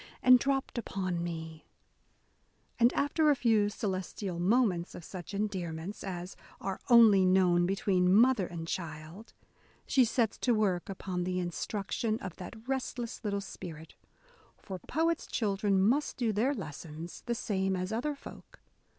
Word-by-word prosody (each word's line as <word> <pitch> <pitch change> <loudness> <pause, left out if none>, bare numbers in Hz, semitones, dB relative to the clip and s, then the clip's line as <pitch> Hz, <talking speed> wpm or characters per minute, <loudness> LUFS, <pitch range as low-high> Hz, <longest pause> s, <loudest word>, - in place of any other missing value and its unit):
And 255 0 +8
dropt 270 -2 -1
upon 185 -5 -3
me, 160 -2 -6 0.5
— - - -39
and, 235 +1 +6
after 300 +2 +2
a 290 - +5
few 220 -5 +3
celestial 190 -3 -4
moments 190 -3 +2
of 175 - -9
such 180 +3 -8
endearments 195 -2 -4
as 180 -1 -5 0.2
are 195 -1 -4
only 225 -5 +7
known 180 -2 +4
between 185 -1 +2
mother 220 -2 +5
and 165 -1 -6
child, 165 +5 -6 0.5
she 265 - +4
sets 230 -2 0
to 245 -2 +2
work 195 -5 0
upon 185 -2 -3
the 180 0 -2
instruction 205 +5 -2
of 185 -6 -8
that 220 +5 -10
restless 250 -3 -3
little 200 -2 -1
spirit: 165 -5 -9 0.6
for 190 -2 -7
poets' 325 - -1
children 200 -2 +1
must 245 +10 +2
do 230 -4 0
their 250 +8 +1
lessons, 160 - -8
the 240 - 0
same 195 -4 -1
as 185 +2 -3
other 285 +6 -1
folk. - - -13
195 Hz, 145 wpm, -31 LUFS, 180-235 Hz, 0.6 s, And